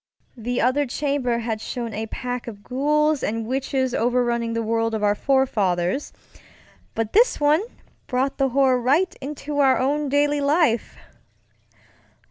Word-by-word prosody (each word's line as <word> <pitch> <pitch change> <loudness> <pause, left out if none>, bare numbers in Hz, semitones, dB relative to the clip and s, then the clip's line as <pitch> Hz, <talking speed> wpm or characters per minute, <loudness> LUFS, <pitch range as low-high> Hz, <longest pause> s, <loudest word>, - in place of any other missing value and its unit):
The 245 +1 -3
other 270 +3 +2
chamber 270 -2 -1
had 225 -2 -3
shown 235 -2 -5
a 220 +2 -4
pack 245 +1 -5
of 205 -3 -9
ghouls 300 +3 +1
and 225 +1 -2
witches 260 +1 -1
overrunning 235 -1 0
the 230 0 -1
world 225 0 0
of 215 - -3
our 205 0 +4
forefathers, 210 -4 0 0.8
but 225 -1 -2
this 475 +4 +4
one 295 +3 +3 0.5
brought 265 +3 -1
the 270 0 +2
horror 260 -1 +3
right 295 +10 +2
into 290 +1 -5
our 265 -2 +4
own 285 +2 0
daily 290 +1 +2
life! 280 -6 +1
255 Hz, 140 wpm, -23 LUFS, 230-285 Hz, 0.8 s, our